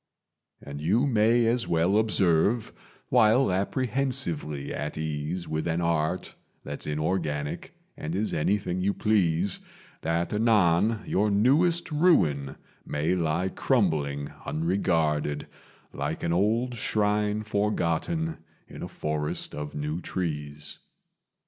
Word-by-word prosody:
"And 70 +1 -7
you 110 - +2
may 115 -1 +3
as 120 +1 +1
well 85 +4 +2
observe, 105 +1 +2 0.4
while 110 +1 +4
apprehensively 100 - 0
at 75 +1 -4
ease 80 +3 -3
With 80 +1 -2
an 85 0 0
Art 85 +1 -1 0.3
that's 70 +1 -6
inorganic 75 -1 -2 0.2
and 80 +3 -5
is 105 +3 -1
anything 90 +2 0
you 100 +2 0
please, 95 -3 +1 0.4
That 85 +3 -1
anon 105 -1 +3
your 105 +3 +1
newest 155 - +3
ruin 90 - +2 0.3
may 75 +4 -1
lie 85 +1 0
crumbling 75 - 0
unregarded, 80 -3 0 0.5
Like - - -3
an 85 - 0
old 115 +7 +1
shrine 105 -1 0
forgotten 105 - -1 0.3
in - - -10
a - - -4
forest 75 -1 -3
of 75 0 -6
new 75 +3 -3
trees. 75 -5 -4
90 Hz, 110 wpm, -27 LUFS, 75-110 Hz, 0.5 s, while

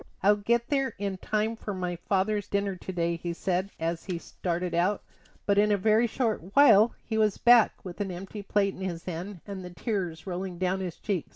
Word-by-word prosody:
"I'll 205 +1 +5
get 235 +3 0
there 270 -2 0
in 200 -1 -3
time 215 +4 -1
for 210 -2 -5
my 180 -1 -2
father's 195 +3 0
dinner 200 -1 -1
to 185 - -7
day," 170 -1 -1
he 170 +1 -4
said 185 +2 -1
as 165 +1 -2
he 180 -3 -3
started 175 +1 -3
out; 180 +4 +1 0.4
but 200 0 +3
in 210 0 +4
a 205 - +4
very 220 +4 +3
short 220 -6 -2
while 230 -6 +7
he 220 -1 -1
was 215 -2 +2
back 240 -4 +5
with 180 +2 -6
an 200 - -2
empty 190 +3 -7
plate 200 0 +1
in - - -11
his 175 -3 -4
hand, 180 +1 -6
and 195 -2 -6
the 180 - -7
tears 175 -3 -3
rolling 185 -1 -4
down 185 +1 0
his 180 -3 -4
cheeks. 195 -6 -3
195 Hz, 210 wpm, -28 LUFS, 180-210 Hz, 0.4 s, while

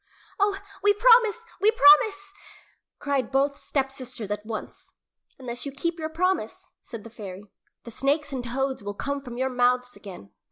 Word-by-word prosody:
"Oh, 405 0 +2 0.2
we 410 +1 +5
promise! 460 -1 +5 0.2
We 415 - +5
promise!" 390 +3 +5 0.6
cried 275 -4 -1
both 280 +1 +2
stepsisters 260 -5 -4
at 210 0 -3
once. 215 0 -8 0.5
"Unless 245 -2 -4
you - - -4
keep 335 +5 -3
your 315 0 -3
promise," 365 +4 -2
said 230 -5 -9
the 230 - -11
fairy, 200 -3 -10 0.3
"the 235 - -10
snakes 285 +4 -1
and 255 -2 -3
toads 265 +2 -2
will 205 0 -5
come 280 +5 -3
from 245 -3 -9
your 260 +1 -1
mouths 250 0 +1
again." 180 - -11
270 Hz, 160 wpm, -25 LUFS, 240-320 Hz, 0.6 s, we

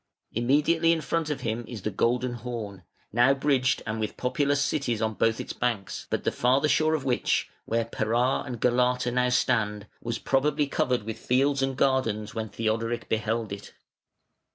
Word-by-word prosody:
Immediately 150 +8 +3
in 160 - -1
front 160 +2 -1
of 150 - -3
him 115 +1 -2
is 110 -6 -7
the 105 - -1
Golden 120 +5 +1
Horn, 115 -5 -6 0.3
now 120 +4 +5
bridged 135 -2 +1
and 110 0 -3
with 110 -1 -3
populous 140 +3 +1
cities 140 -6 0
on 110 0 0
both 115 +1 +1
its - - -5
banks, 110 -8 -2
but - - -1
the - - +1
farther 130 +5 +2
shore 155 +2 +3
of 140 -3 -4
which, 125 -2 +1
where 115 0 0
Pera 115 +3 +1
and 125 -4 -6
Galata 125 +1 +2
now 125 0 +2
stand, 110 -5 +1 0.2
was 115 0 -3
probably 145 +2 +1
covered 125 -4 0
with 110 0 -6
fields 135 +2 +2
and 135 -1 -1
gardens 110 -6 +1
when 110 -1 -4
Theodoric 115 +2 -2
beheld 110 0 -1
it. 100 0 -8
125 Hz, 175 wpm, -27 LUFS, 110-135 Hz, 0.3 s, now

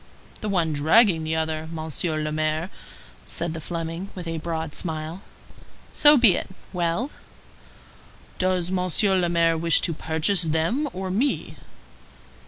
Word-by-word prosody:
"The 215 - -4
one 170 -5 +1
dragging 160 +4 +4
the 160 0 -1
other, 160 0 -2
Monsieur 160 0 -2
le 155 0 -2
Maire," 155 +3 -1 0.6
said 170 -1 -2
the 165 - -6
Fleming, 165 +3 -5
with 180 -2 -7
a 165 -1 -3
broad 160 -1 -4
smile. 160 +1 -5 0.7
"So 295 0 +7
be 235 -7 +6
it. - - -4 0.2
Well?" 180 - -1 1.3
"Does 185 -1 0
Monsieur 190 +2 +2
le 175 -1 +1
Maire 165 -1 +2
wish 165 -1 +4
to 170 - +1
purchase 160 +5 0
them 165 - 0
or 185 0 -4
me?" 245 +9 -1
165 Hz, 140 wpm, -24 LUFS, 160-185 Hz, 1.3 s, So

